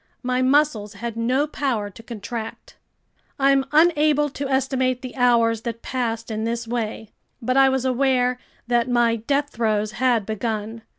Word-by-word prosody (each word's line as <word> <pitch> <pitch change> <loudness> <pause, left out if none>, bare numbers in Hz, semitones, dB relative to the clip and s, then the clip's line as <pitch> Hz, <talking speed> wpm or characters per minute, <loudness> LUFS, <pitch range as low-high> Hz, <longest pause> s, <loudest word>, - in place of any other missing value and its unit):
My 250 0 0
muscles 255 -6 +2
had 230 +2 -5
no 250 +5 +1
power 245 -9 -2
to 225 - -13
contract. 225 0 -7 0.6
I'm 275 -1 +3
unable 300 -2 +4
to 275 0 -4
estimate 260 -1 0
the 255 - -7
hours 230 -3 +3
that 230 -1 -5
passed 230 -3 -3
in 215 0 -3
this 230 0 -2
way. 220 -2 -4 0.3
But 255 +1 -1
I 270 0 +6
was 265 -1 -1
aware 255 -1 +1 0.3
that 240 0 +1
my 240 -1 +2
death 285 +6 -1
throes 215 -2 0
had 240 -3 +1
begun. 220 +1 -3
245 Hz, 155 wpm, -22 LUFS, 225-265 Hz, 0.6 s, I